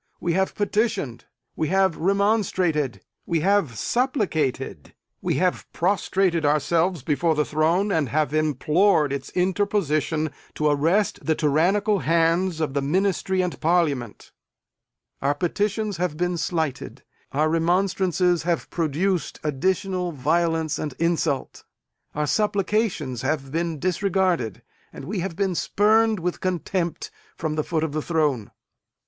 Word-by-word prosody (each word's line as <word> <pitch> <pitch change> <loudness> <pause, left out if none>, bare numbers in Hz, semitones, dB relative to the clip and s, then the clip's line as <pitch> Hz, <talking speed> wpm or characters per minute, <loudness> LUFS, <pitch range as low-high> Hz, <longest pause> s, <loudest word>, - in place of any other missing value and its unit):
We 170 - -1
have 190 +2 0
petitioned; 205 - -1 0.3
we 155 - -1
have 190 -1 +2
remonstrated; 185 - +1 0.3
we 165 -2 +1
have 190 - +1
supplicated; 160 - -1 0.3
we - - 0
have 180 0 -1
prostrated 185 -2 +1
ourselves 160 +2 +1
before 160 +3 +1
the 150 0 +1
throne, 165 +7 +1
and 155 -8 +1
have 150 0 0
implored 155 +1 +2
its 140 - -5
interposition 180 -5 0 0.2
to 150 0 +1
arrest 165 +8 +1
the 160 - +1
tyrannical 190 +8 +2
hands 165 +1 +1
of 150 -4 -1
the 140 - 0
Ministry 185 +4 +1
and 180 - -4
Parliament. 155 -9 0 0.9
Our 140 +1 +1
petitions 205 +4 -1
have 175 -3 -2
been 180 +1 0
slighted; 160 -4 -3 0.3
our 150 +3 +2
remonstrances 180 +1 +1
have 170 +1 -2
produced 170 +3 -1
additional 180 +4 -1
violence 160 +2 0
and 150 -4 -4
insult; 165 -4 -1 0.5
our 150 0 0
supplications 200 - 0
have 135 -1 -2
been 165 0 -1
disregarded; 185 - 0 0.3
and - - -9
we 200 +1 -3
have 180 -1 -3
been 195 0 0
spurned, 215 +4 +2
with 175 +1 -3
contempt, 180 -1 -2 0.3
from 160 -2 -2
the 155 0 -1
foot 160 -1 -1
of 160 - -1
the 155 +1 -2
throne! 150 -9 0
170 Hz, 130 wpm, -24 LUFS, 150-190 Hz, 0.9 s, have